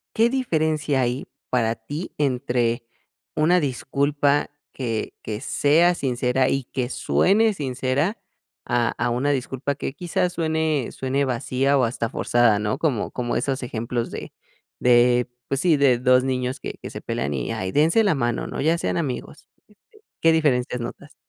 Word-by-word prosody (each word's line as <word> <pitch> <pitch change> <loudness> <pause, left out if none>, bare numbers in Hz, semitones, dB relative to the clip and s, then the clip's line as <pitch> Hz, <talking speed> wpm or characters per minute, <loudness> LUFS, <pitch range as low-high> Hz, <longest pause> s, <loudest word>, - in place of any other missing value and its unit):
¿Qué 230 +1 +4
diferencia 155 - 0
hay 125 +1 -1 0.2
para 115 -2 +1
ti 145 +10 -6
entre 125 -4 0 0.5
una 170 +4 +4
disculpa 145 +1 0 0.2
que 115 -4 -3
que 105 -1 -5
sea 160 +5 +3
sincera 130 -3 0
y 135 0 0
que 125 -1 -3
suene 215 +9 +2
sincera 135 - -1 0.5
a 120 -2 +1
a 120 - 0
una 125 +4 0
disculpa 135 +1 -2
que 135 - -4
quizás 175 +2 -1
suene 160 -5 0
suene 135 +2 -1
vacía 130 +2 +1
o 130 - +3
hasta 115 -1 -1
forzada, 120 -4 +2
¿no?, 105 +1 -1
como 135 -10 0
como 120 -1 -2
esos 135 -1 -1
ejemplos 120 0 -3
de - - -7 0.5
de, 125 0 +4 0.2
pues 135 - 0
sí, 170 -1 +4
de 135 -3 +4
2 125 0 +4
niños 130 0 -2
que - - -5
que - - -6
se - - -8
pelan 70 +2 -2
y 65 -3 -3
ahí, 95 0 -3
dense 160 - +4
la 200 -6 +2
mano, 120 -3 -1
¿no?, - - -4
ya 160 +4 +2
sean 170 - -1
amigos, 150 -2 -4 0.7
¿qué 165 - +5
diferencias 125 -6 +1
notas? 120 - -8
135 Hz, 160 wpm, -23 LUFS, 120-155 Hz, 0.7 s, qué